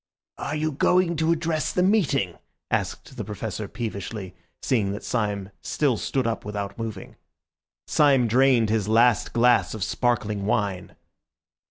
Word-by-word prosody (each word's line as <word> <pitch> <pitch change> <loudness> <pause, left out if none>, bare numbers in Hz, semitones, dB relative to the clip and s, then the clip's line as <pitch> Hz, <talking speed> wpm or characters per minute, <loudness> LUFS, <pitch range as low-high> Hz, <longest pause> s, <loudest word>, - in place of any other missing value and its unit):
"Are 155 - -3
you 155 +1 -1
going 170 +4 +2
to 160 +1 +2
address 165 -1 0
the 180 - +1
meeting?" 145 - +1 0.3
asked 130 - -3
the 110 - -3
Professor 105 0 -5
peevishly, 100 -4 -5 0.3
seeing 105 -7 +1
that 105 - -7
Syme 105 -4 -2
still 140 -5 +1
stood 130 +3 -1
up 115 -1 -2
without 100 -1 -4
moving. 110 -4 -6 0.7
Syme 135 -5 +4
drained 120 -2 +4
his 110 -3 0
last 115 +1 +3
glass 120 -1 +3
of 105 - -3
sparkling 105 -3 -1
wine. 100 -4 -1
115 Hz, 140 wpm, -25 LUFS, 105-135 Hz, 0.7 s, Syme